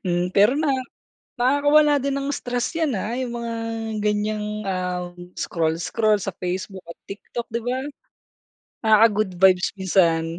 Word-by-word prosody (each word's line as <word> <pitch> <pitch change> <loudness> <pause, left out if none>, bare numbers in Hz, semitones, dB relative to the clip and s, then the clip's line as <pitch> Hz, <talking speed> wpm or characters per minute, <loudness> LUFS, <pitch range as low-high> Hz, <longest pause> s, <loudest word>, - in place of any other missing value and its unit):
Hmm. 175 0 0
Pero 205 +4 +5
na 310 -2 +1 0.7
nakakawala 290 +3 +4
din 280 0 -1
ng 275 +1 -3
stress 245 +3 -3
yan, 320 -3 +1
ah, 220 +5 -3
yung 250 -2 -3
mga 235 0 -4 0.5
ganiyang, 210 0 -1 0.2
ah, 180 -1 -2 0.3
scroll-scroll 175 +6 0
sa 195 -2 -4
Facebook 185 +1 -4
at 170 - -10
TikTok, 230 +4 -6
di 230 +1 -3
ba? 250 +1 -1 1.1
Nakaka-good 215 -2 +4
vibes 185 -1 +4
minsan. 170 -3 +2
210 Hz, 135 wpm, -23 LUFS, 185-245 Hz, 1.1 s, Pero